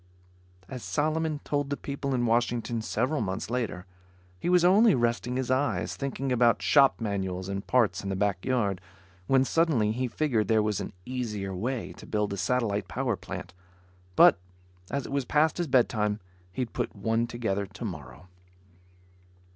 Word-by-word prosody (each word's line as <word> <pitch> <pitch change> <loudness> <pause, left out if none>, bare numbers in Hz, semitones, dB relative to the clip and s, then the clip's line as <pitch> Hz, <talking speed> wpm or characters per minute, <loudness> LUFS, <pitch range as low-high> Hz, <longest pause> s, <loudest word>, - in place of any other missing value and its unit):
As 125 +4 -7
Solomon 155 +1 -1
told 145 -1 -1
the 140 - -2
people 140 -1 -3
in 120 -1 +1
Washington 120 0 0
several 125 +7 -1
months 95 +1 -3
later, 115 -7 -2 0.5
he 175 - -2
was 180 -1 +5
only 205 +4 +6
resting 120 0 0
his 130 -1 -1
eyes, 135 +3 0
thinking 135 -1 -3
about 120 -2 +3
shop 140 -2 +5
manuals 95 -4 -3
and 100 0 -4
parts 120 -5 +2
in 100 - -5
the 95 - -1
back 100 -2 0
yard. 105 -8 0 0.5
When 135 -1 +4
suddenly 140 -10 +2
he 125 +3 -1
figured 120 -5 0
there 110 -1 +3
was 105 -1 0
an - - -6
easier 105 -7 -3
way 120 +6 -3
to - - -12
build 105 -2 -1
a - - -4
satellite 105 -1 0
power 120 +3 -1
plant. 90 -2 -8 0.6
But, - - +7 0.5
as 140 -1 -2
it - - -8
was 140 -1 0
past 155 +5 +2
his 175 - 0
bedtime, 110 -5 +2 0.3
he'd 125 +3 -4
put - - -3
one 115 +3 0
together 100 -5 -2
tomorrow. 90 - -8
120 Hz, 165 wpm, -28 LUFS, 100-135 Hz, 0.6 s, But